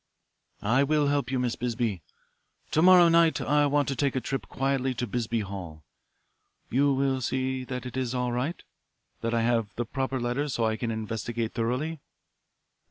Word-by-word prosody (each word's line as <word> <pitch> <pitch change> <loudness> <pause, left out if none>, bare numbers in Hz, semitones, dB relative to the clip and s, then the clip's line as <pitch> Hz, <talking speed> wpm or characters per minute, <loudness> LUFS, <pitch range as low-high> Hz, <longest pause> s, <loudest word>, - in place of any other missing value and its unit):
"I 125 +6 +3
will 150 0 +2
help 140 -3 0
you, 130 - 0
Miss 125 -2 0
Bisbee. 115 -6 -2 0.7
To 155 - +3
morrow 180 0 +8
night 165 -1 +4
I 145 +1 +2
want 145 0 +2
to 135 - -1
take 135 +1 0
a - - +2
trip 135 +1 -4
quietly 135 -1 -1
to 125 - -2
Bisbee 115 0 -1
Hall. 90 -6 -7 0.9
You 140 +3 +3
will 135 -1 +1
see 130 +1 -1
that 125 0 -5
it 125 - -7
is 130 -1 -2
all 125 -1 0
right, 130 +8 -2 0.6
that 115 +1 -1
I 115 - +2
have 115 -3 0
the 120 - -2
proper 130 +2 -2
letters 125 +4 -1
so 115 - +1
I 110 0 +1
can 115 +1 -3
investigate 115 +1 -3
thoroughly." 130 +8 -2
125 Hz, 175 wpm, -27 LUFS, 115-140 Hz, 0.9 s, morrow